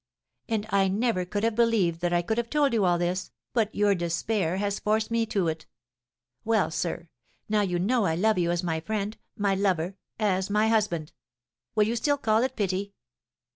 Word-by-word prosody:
"And 220 -2 0
I 195 -1 +3
never 200 -1 0
could 205 +3 -3
have 230 0 +2
believed 215 -8 +2
that 175 0 0
I 175 0 +2
could 220 +6 -1
have 235 -1 -3
told 290 -4 +2
you 215 -4 +2
all 175 -1 +3
this, 175 +2 -1 0.2
but 220 -3 0
your 205 -1 +3
despair 175 +1 -1
has 200 0 -1
forced 215 +2 0
me 230 -1 +1
to 195 -5 0
it. 160 -1 -4 0.8
Well, 220 -5 +1
sir, 170 +1 -3 0.4
now 215 0 +2
you 180 -3 0
know 210 +3 +2
I 160 - +1
love 215 +3 +2
you 170 -1 +1
as 175 +1 0
my 165 -2 -1
friend, 210 +4 -3 0.2
my 200 -2 +1
lover 190 -1 0 0.2
as 195 -3 0
my 210 +2 +2
husband! 185 -9 0 0.6
Will 215 - +5
you 230 +2 -1
still 285 +5 +1
call 220 -4 +2
it 260 +1 -1
pity?" 200 -1 -2
200 Hz, 195 wpm, -27 LUFS, 180-220 Hz, 0.8 s, Will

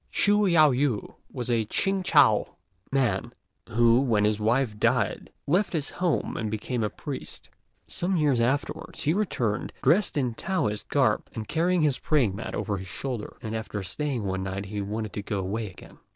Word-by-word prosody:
Chü 205 0 +3
Yao 155 -5 +6
ju 125 -4 0 0.2
was 125 -2 -3
a 115 -2 +2
Ch'ing 195 - 0
chou 145 - +5 0.5
man, 120 -4 0 0.4
who, 120 +1 +4
when 115 -6 +2
his 105 0 +1
wife 110 0 +1
died, - - +1 0.2
left 190 +2 +1
his 150 -4 -1
home 175 -4 -1
and 110 -2 -2
became 110 +2 -2
a 105 - 0
priest. - - -7 0.4
Some 180 +1 -1
years 145 -6 +2
afterwards 135 +5 -1
he 155 - +2
returned, 125 - -1
dressed 185 -2 +3
in 130 -3 +1
the 115 - -9
Taoist 105 - -2
garb, - - +2
and 110 -1 -5
carrying 170 +1 +2
his 145 -4 +2
praying 125 -11 +2
mat 110 - -5
over 105 -2 -2
his 95 0 -7
shoulder; 120 +4 -5
and 110 0 -3
after 110 -2 -4
staying 135 +3 -3
one 95 -1 -2
night 95 +1 -4
he 100 +1 -4
wanted 105 +1 -4
to 105 - -3
go 100 0 -3
away 100 +3 -2
again. 95 - -15
120 Hz, 180 wpm, -27 LUFS, 105-150 Hz, 0.5 s, Yao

